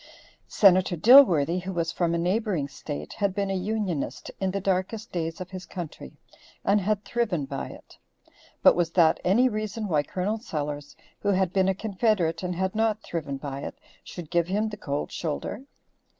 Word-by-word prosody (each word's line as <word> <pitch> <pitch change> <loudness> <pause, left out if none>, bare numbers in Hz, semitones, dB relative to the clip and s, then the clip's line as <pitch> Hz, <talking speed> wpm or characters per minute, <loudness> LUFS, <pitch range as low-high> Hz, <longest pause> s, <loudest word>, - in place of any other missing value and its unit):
Senator 185 -3 +4
Dilworthy, 180 - +7
who 190 +2 -5
was 170 -1 -1
from 170 -1 0
a - - +1
neighboring 180 -3 0
state, 145 +1 -7
had 200 -2 -1
been 200 -1 -1
a - - 0
Unionist 185 - -3
in 190 - 0
the 200 +2 -2
darkest 195 +4 -2
days 165 -2 -3
of 185 0 -7
his 185 -1 -8
country, 165 - -8 0.5
and 205 +1 +3
had 205 +2 -1
thriven 205 -11 -1
by 135 0 -5
it, - - -14 0.6
but - - +7
was 175 -2 +1
that 165 -3 +4
any 220 +8 +4
reason 215 -1 -3
why 155 -5 +2
Col. 190 +8 -2
Sellers, 145 - -5 0.2
who 205 - -1
had 190 -2 +1
been 190 -1 +3
a 190 - +1
confederate 195 -5 0
and 180 -1 -3
had 190 +1 -1
not 220 0 0
thriven 145 -5 -4
by 135 -1 -5
it, - - -7 0.3
should 170 -4 -9
give 170 -1 +2
him 210 +4 0
the 210 - -6
cold 145 -6 -3
shoulder? 165 - -4
185 Hz, 180 wpm, -26 LUFS, 165-210 Hz, 0.6 s, Dilworthy